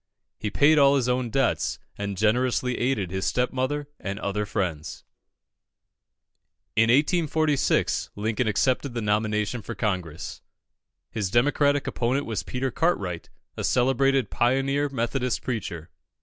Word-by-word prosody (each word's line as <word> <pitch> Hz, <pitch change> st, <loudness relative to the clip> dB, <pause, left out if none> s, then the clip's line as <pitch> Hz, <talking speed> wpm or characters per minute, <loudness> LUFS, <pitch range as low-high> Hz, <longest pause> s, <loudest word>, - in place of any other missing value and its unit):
He 105 Hz, -, -2 dB
paid 150 Hz, +7 st, +4 dB
all 140 Hz, 0 st, +6 dB
his 130 Hz, -3 st, +1 dB
own 125 Hz, -1 st, 0 dB
debts, 135 Hz, +1 st, 0 dB, 0.2 s
and 100 Hz, -1 st, -4 dB
generously 125 Hz, +3 st, +1 dB
aided 115 Hz, -8 st, 0 dB
his 95 Hz, 0 st, -2 dB
stepmother 130 Hz, +3 st, -1 dB
and 100 Hz, 0 st, -4 dB
other 105 Hz, +1 st, -2 dB
friends. 80 Hz, -7 st, -3 dB, 1.7 s
In 115 Hz, +1 st, +4 dB
1846, 155 Hz, +1 st, +2 dB
Lincoln 110 Hz, +3 st, -1 dB
accepted 125 Hz, +4 st, 0 dB
the 120 Hz, -, -1 dB
nomination 105 Hz, +2 st, 0 dB
for -, -, -7 dB
Congress. 90 Hz, -7 st, -3 dB, 0.7 s
His 105 Hz, -4 st, -2 dB
Democratic 145 Hz, +4 st, +2 dB
opponent 130 Hz, +4 st, -1 dB
was 110 Hz, -5 st, -2 dB
Peter 125 Hz, +9 st, -3 dB
Cartwright, 100 Hz, -, -1 dB, 0.3 s
a -, -, -4 dB
celebrated 135 Hz, -1 st, +2 dB
pioneer 135 Hz, +4 st, +1 dB
Methodist 125 Hz, 0 st, -1 dB
preacher. 90 Hz, -9 st, -4 dB
120 Hz, 120 wpm, -25 LUFS, 105-135 Hz, 1.7 s, all